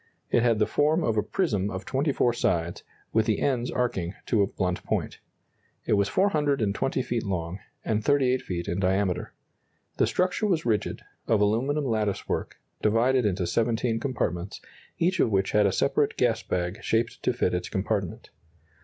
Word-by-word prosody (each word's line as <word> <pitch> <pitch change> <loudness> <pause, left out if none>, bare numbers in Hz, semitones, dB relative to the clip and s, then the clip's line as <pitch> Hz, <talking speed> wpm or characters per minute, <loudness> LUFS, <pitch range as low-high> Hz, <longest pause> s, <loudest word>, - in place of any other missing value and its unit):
It - - +4
had 115 -2 +3
the 105 - +3
form 155 +7 +2
of 115 - +1
a 105 - +3
prism 105 - 0
of 95 -1 -5
24 135 -3 +1
sides, 85 -6 0 0.3
with 110 -1 +2
the 110 - +1
ends 125 -3 0
arching 100 -8 -1
to 110 - +2
a 100 - +3
blunt 90 -2 -2
point. - - -2 0.7
It - - +1
was 100 -1 +2
420 140 - +1
feet 120 -2 -1
long, 90 -2 -3 0.3
and 110 -1 0
38 130 -1 +3
feet 85 -2 -4
in 85 - -1
diameter. 95 -1 0 0.6
The - - +3
structure 185 +4 +1
was 175 -6 0
rigid, 110 -3 -1 0.2
of 110 - +3
aluminum 125 +8 +1
lattice 110 -5 -1
work, - - -2 0.3
divided 115 +3 +3
into 95 -2 -1
17 115 +4 0
compartments, 100 - -2 0.4
each 180 +3 +1
of - - +4
which 95 -2 +1
had 105 -1 +4
a - - +1
separate 140 +7 +1
gas 115 -4 +2
bag 90 +2 -3
shaped 115 +1 0
to - - +2
fit 120 -7 0
its 90 0 -2
compartment. 95 -2 -2
110 Hz, 170 wpm, -27 LUFS, 95-130 Hz, 0.7 s, It